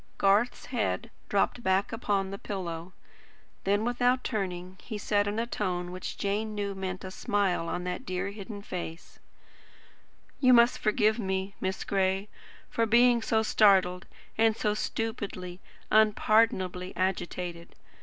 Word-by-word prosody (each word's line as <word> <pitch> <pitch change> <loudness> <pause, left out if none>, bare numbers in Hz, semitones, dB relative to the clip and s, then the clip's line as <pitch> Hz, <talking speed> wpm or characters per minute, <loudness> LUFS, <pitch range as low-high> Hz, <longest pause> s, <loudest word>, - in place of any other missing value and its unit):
Garth's 205 +5 +2
head 230 -1 -2 0.2
dropped 205 +4 +1
back 190 -1 +1
upon 200 -4 -1
the 200 - -6
pillow. 175 -3 -5 0.7
Then 205 +3 +2
without 245 +1 +2
turning 185 -4 -3
he 220 - -6
said 205 0 +1
in 205 +1 -2
a 230 - 0
tone 180 -6 -2
which 185 0 -6
Jane 210 +2 -1
knew 200 -1 -2
meant 190 -1 -5
a 190 - -6
smile 190 -4 0
on 180 - -3
that 180 +6 -4
dear 190 -3 -3
hidden 205 0 -8
face: 170 -3 -7 1.2
"You 255 -2 +6
must 240 +1 +5
forgive 215 +1 +2
me, 190 -1 -2
Miss 190 0 -2
Gray, 195 +1 0 0.4
for 230 0 0
being 240 +1 +5
so 220 0 +1
startled 190 -5 +4 0.3
and 225 -1 +4
so 210 - +1
stupidly, 205 -5 -4 0.3
unpardonably 210 -4 +3
agitated. 175 -2 -3
200 Hz, 135 wpm, -29 LUFS, 185-220 Hz, 1.2 s, You